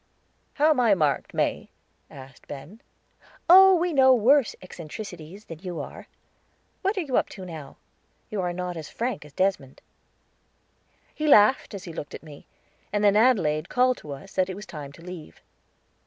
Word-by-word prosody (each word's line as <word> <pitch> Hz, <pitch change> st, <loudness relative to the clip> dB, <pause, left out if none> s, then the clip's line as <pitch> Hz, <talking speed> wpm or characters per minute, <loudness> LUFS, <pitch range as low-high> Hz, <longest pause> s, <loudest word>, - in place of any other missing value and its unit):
"How 300 Hz, +2 st, +3 dB
am 295 Hz, -, +1 dB
I 230 Hz, -5 st, +4 dB
marked, 150 Hz, -5 st, 0 dB
May?" -, -, -2 dB, 0.4 s
asked 135 Hz, -1 st, -14 dB
Ben. 145 Hz, +10 st, -10 dB, 0.7 s
"Oh, 380 Hz, +2 st, +8 dB
we 350 Hz, 0 st, 0 dB
know 265 Hz, -2 st, +6 dB
worse 255 Hz, +2 st, +3 dB
eccentrics 185 Hz, +3 st, -8 dB, 0.3 s
than 165 Hz, -2 st, -10 dB
you 175 Hz, -3 st, -6 dB
are. 145 Hz, -, -8 dB, 0.7 s
What 395 Hz, +2 st, -1 dB
are -, -, +1 dB
you 275 Hz, -6 st, -1 dB
up -, -, +1 dB
to 190 Hz, -, -9 dB
now? 155 Hz, -6 st, -9 dB, 0.5 s
You 210 Hz, -3 st, -2 dB
are 180 Hz, -1 st, -1 dB
not 180 Hz, 0 st, -4 dB
as 160 Hz, -3 st, -7 dB
frank 240 Hz, -8 st, -4 dB
as 150 Hz, -, -14 dB
Desmond." 185 Hz, -7 st, -1 dB, 1.3 s
He 305 Hz, -, -3 dB
laughed 215 Hz, -3 st, +5 dB
as 195 Hz, -, -8 dB
he 170 Hz, -, -8 dB
looked 145 Hz, -, -7 dB
at -, -, -11 dB
me, 150 Hz, -3 st, -13 dB, 0.4 s
and 205 Hz, 0 st, 0 dB
then 205 Hz, -1 st, +4 dB
Adelaide 190 Hz, -10 st, +2 dB
called 255 Hz, 0 st, +2 dB
to 150 Hz, -, -10 dB
us 145 Hz, +8 st, -12 dB
that 185 Hz, 0 st, +1 dB
it 185 Hz, -, -5 dB
was 205 Hz, +1 st, -9 dB
time 145 Hz, -5 st, -9 dB
to 165 Hz, -, -15 dB
leave. 180 Hz, -3 st, -10 dB
190 Hz, 175 wpm, -25 LUFS, 155-255 Hz, 1.3 s, Oh